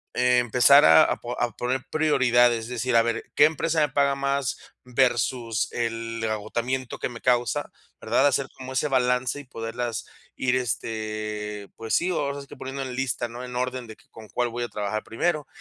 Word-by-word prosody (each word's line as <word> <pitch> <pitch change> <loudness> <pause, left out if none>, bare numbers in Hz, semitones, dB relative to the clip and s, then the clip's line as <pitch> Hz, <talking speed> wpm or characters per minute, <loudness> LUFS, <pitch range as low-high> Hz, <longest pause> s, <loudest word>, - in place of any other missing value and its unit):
empezar 125 +2 +5
a 80 0 +8
a - - 0
po 120 +1 -6
a 120 - 0
poner 125 +2 -2
prioridades, 120 -6 +3
es - - -8
decir, 125 0 -1
a 115 - +6
ver 115 0 -1
qué 145 - +7
empresa 160 +1 +1
me 150 - +2
paga 140 +1 +2
más, 140 0 -1 0.3
versus 120 -2 +1
el 115 -1 -3
agotamiento 120 +4 -3
que - - -2
me 120 -1 -9
causa, 120 -3 +1 0.3
¿verdad?, 140 - +3
hacer 135 -1 +1
como 130 0 -8
ese 130 +3 +1
balance 125 0 +1
y - - -9
poderlas 115 -2 -4 0.3
ir, 130 -1 +1
este, 110 -4 -3
pues 115 -1 -2
sí, 175 - +1
ahora 140 -4 -2
sí - - -11
que - - -12
poniendo 135 +1 -5
en 130 -1 -6
lista, 125 -2 -1
¿no?, 120 +2 -8
en 125 -1 -7
orden 125 0 -2
de 110 - -10
que - - -25
con 110 -1 -12
cuál 120 -1 -1
voy 120 +1 -5
a - - -2
trabajar 105 +1 -3
primero. 150 +5 -1
125 Hz, 190 wpm, -25 LUFS, 115-135 Hz, 0.3 s, a